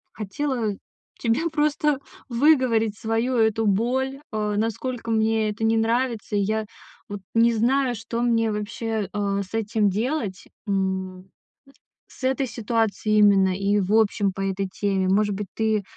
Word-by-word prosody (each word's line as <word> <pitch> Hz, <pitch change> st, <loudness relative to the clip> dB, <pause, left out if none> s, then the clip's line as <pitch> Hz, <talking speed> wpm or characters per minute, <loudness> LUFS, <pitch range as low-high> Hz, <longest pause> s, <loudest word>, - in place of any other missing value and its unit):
Хотела 220 Hz, 0 st, -2 dB, 0.4 s
тебе 250 Hz, +9 st, 0 dB
просто 300 Hz, -2 st, +1 dB, 0.3 s
выговорить 235 Hz, -5 st, +3 dB
свою 225 Hz, +3 st, -1 dB
эту 220 Hz, -1 st, +2 dB
боль, 260 Hz, +7 st, 0 dB
э, 210 Hz, -1 st, -1 dB
насколько 230 Hz, +2 st, -2 dB
мне 220 Hz, -1 st, +2 dB
это 215 Hz, +2 st, -4 dB
не 225 Hz, 0 st, +3 dB
нравится. 230 Hz, -1 st, 0 dB
И -, -, +2 dB
я 215 Hz, +2 st, -1 dB, 0.4 s
вот 205 Hz, -1 st, -6 dB
не 230 Hz, +1 st, +5 dB
знаю, 250 Hz, +3 st, +2 dB
что 230 Hz, +1 st, -4 dB
мне 230 Hz, -2 st, +2 dB
вообще, 215 Hz, 0 st, -3 dB
э, 200 Hz, -1 st, -1 dB
с 190 Hz, +3 st, -12 dB
этим 215 Hz, -2 st, +1 dB
делать. 215 Hz, -2 st, -2 dB, 0.2 s
М, 190 Hz, -1 st, -2 dB, 0.8 s
с -, -, -17 dB
этой 265 Hz, +1 st, +1 dB
ситуацией 225 Hz, -2 st, 0 dB
именно, 195 Hz, -2 st, +4 dB
и 200 Hz, +1 st, +1 dB
в 195 Hz, +3 st, -1 dB
общем, 205 Hz, -2 st, +3 dB
по 195 Hz, -, -6 dB
этой 195 Hz, 0 st, -1 dB
теме. 190 Hz, -1 st, -1 dB
Может 205 Hz, +2 st, +2 dB
быть, 205 Hz, 0 st, -4 dB
ты 220 Hz, -2 st, +1 dB
220 Hz, 145 wpm, -24 LUFS, 205-235 Hz, 0.8 s, не